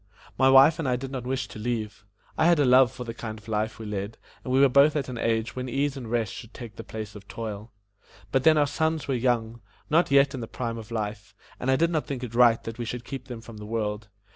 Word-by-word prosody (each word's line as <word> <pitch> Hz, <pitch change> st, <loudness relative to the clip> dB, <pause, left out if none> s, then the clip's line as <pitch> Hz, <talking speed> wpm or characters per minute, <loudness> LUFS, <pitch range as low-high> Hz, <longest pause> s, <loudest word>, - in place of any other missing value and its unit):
My 130 Hz, 0 st, +4 dB
wife 135 Hz, +5 st, +7 dB
and 155 Hz, -, -1 dB
I 125 Hz, -, +2 dB
did 130 Hz, +2 st, -6 dB
not 125 Hz, -3 st, -5 dB
wish 130 Hz, -3 st, -2 dB
to -, -, -9 dB
leave. 110 Hz, -3 st, -4 dB, 0.3 s
I 160 Hz, -, +3 dB
had 170 Hz, -1 st, +5 dB
a 145 Hz, -, +3 dB
love 125 Hz, 0 st, +6 dB
for 130 Hz, -1 st, -7 dB
the 115 Hz, -1 st, -6 dB
kind 110 Hz, -2 st, -6 dB
of 110 Hz, +1 st, -16 dB
life 110 Hz, 0 st, -1 dB
we 110 Hz, -, -8 dB
led, 105 Hz, +1 st, -4 dB, 0.3 s
and 125 Hz, -, -4 dB
we 130 Hz, -, +4 dB
were 140 Hz, -, +7 dB
both 140 Hz, +3 st, +5 dB
at 140 Hz, -4 st, -1 dB
an 120 Hz, -2 st, -5 dB
age 115 Hz, -1 st, 0 dB
when 130 Hz, 0 st, -4 dB
ease 140 Hz, +3 st, 0 dB
and 125 Hz, -5 st, -7 dB
rest 115 Hz, -4 st, -1 dB
should 115 Hz, -, -10 dB
take 115 Hz, -3 st, -9 dB
the 115 Hz, -, -8 dB
place 110 Hz, -2 st, -7 dB
of 100 Hz, -1 st, -12 dB
toil. 110 Hz, -1 st, -6 dB, 0.6 s
But 130 Hz, -1 st, +2 dB
then 160 Hz, -1 st, +6 dB
our 145 Hz, -, +4 dB
sons 160 Hz, +2 st, -1 dB
were 135 Hz, -, 0 dB
young 120 Hz, -2 st, 0 dB, 0.3 s
not 165 Hz, +3 st, +4 dB
yet 140 Hz, 0 st, +4 dB
in 130 Hz, -, -4 dB
the 115 Hz, -, -5 dB
prime 115 Hz, -1 st, -4 dB
of 110 Hz, -, -10 dB
life 105 Hz, -2 st, -5 dB, 0.2 s
and 125 Hz, -, -2 dB
I 130 Hz, -, +5 dB
did 165 Hz, +5 st, +2 dB
not 155 Hz, -3 st, -1 dB
think 130 Hz, -3 st, -4 dB
it 120 Hz, -2 st, -6 dB
right 120 Hz, -1 st, +5 dB
that 115 Hz, +1 st, -7 dB
we 120 Hz, -, -2 dB
should 120 Hz, +1 st, -5 dB
keep 135 Hz, -1 st, -7 dB
them 120 Hz, -3 st, -7 dB
from 115 Hz, -1 st, -11 dB
the 105 Hz, -, -8 dB
world. 105 Hz, -1 st, -3 dB
120 Hz, 270 wpm, -26 LUFS, 110-135 Hz, 0.6 s, wife